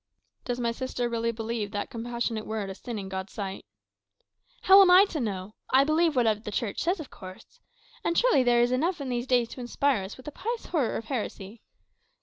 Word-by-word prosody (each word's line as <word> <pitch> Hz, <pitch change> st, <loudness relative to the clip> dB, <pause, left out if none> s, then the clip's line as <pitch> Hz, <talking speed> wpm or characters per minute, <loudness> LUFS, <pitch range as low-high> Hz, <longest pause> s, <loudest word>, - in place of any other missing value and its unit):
"Does 245 Hz, -1 st, -2 dB
my 235 Hz, -1 st, 0 dB
sister 250 Hz, 0 st, -3 dB
really 230 Hz, 0 st, -1 dB
believe 225 Hz, -2 st, -3 dB
that 205 Hz, -1 st, -4 dB
compassionate 235 Hz, -1 st, -3 dB
word 215 Hz, -3 st, -3 dB
a -, -, -5 dB
sin 235 Hz, +3 st, -7 dB
in 195 Hz, -2 st, -5 dB
God's 190 Hz, 0 st, -5 dB
sight?" 195 Hz, -2 st, -5 dB, 1.0 s
"How 390 Hz, +1 st, +9 dB
am 380 Hz, -, +6 dB
I 370 Hz, +3 st, +8 dB
to 340 Hz, -6 st, -4 dB
know? 200 Hz, -4 st, -4 dB, 0.2 s
I 265 Hz, +1 st, +5 dB
believe 310 Hz, +1 st, +2 dB
whatever 225 Hz, -4 st, +2 dB
the 215 Hz, -, -7 dB
Church 210 Hz, -1 st, -2 dB
says, 355 Hz, +3 st, 0 dB
of 305 Hz, -, -8 dB
course. 185 Hz, -1 st, -12 dB, 0.4 s
And 340 Hz, -, 0 dB
surely 485 Hz, -, +4 dB
there 240 Hz, -1 st, +4 dB
is 240 Hz, -, +1 dB
enough 330 Hz, +7 st, 0 dB
in 275 Hz, -2 st, -4 dB
these 245 Hz, 0 st, -2 dB
days 245 Hz, -2 st, +2 dB
to 255 Hz, -, -8 dB
inspire 245 Hz, -1 st, +1 dB
us 190 Hz, -, -8 dB
with 260 Hz, -, -14 dB
a -, -, -4 dB
pious 460 Hz, +9 st, -4 dB
horror 290 Hz, -9 st, 0 dB
of 225 Hz, -, -6 dB
heresy. 220 Hz, -3 st, -5 dB
240 Hz, 210 wpm, -27 LUFS, 215-280 Hz, 1.0 s, How